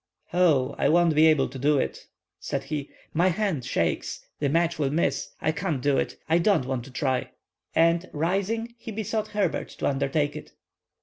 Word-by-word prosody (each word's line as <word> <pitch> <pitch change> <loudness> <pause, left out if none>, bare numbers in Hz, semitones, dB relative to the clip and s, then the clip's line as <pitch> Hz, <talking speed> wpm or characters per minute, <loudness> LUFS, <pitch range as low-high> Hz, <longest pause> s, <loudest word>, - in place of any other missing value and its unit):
"Ho, 155 -7 +3
I - - +3
won't 170 0 +4
be 155 +1 +6
able 155 -4 +4
to 135 +1 -8
do 145 +2 +3
it," - - -3 0.3
said - - -3
he; 145 -3 -4 0.2
"my 170 +4 +3
hand 185 - 0
shakes—the 120 - -2
match 165 +2 +1
will 140 -3 +1
miss—I 155 0 -1
can't 165 -4 -2
do 140 +1 +2
it—I 165 +2 0
don't 180 -6 +3
want 130 -2 -3
to 135 - -12
try!" 130 0 -1 0.5
And, 170 +2 +3
rising, 200 +9 -1
he 225 - -7
besought 215 0 -2
Herbert 205 -5 -1
to - - -3
undertake 140 +1 0
it. 150 - -9
155 Hz, 170 wpm, -26 LUFS, 140-180 Hz, 0.5 s, be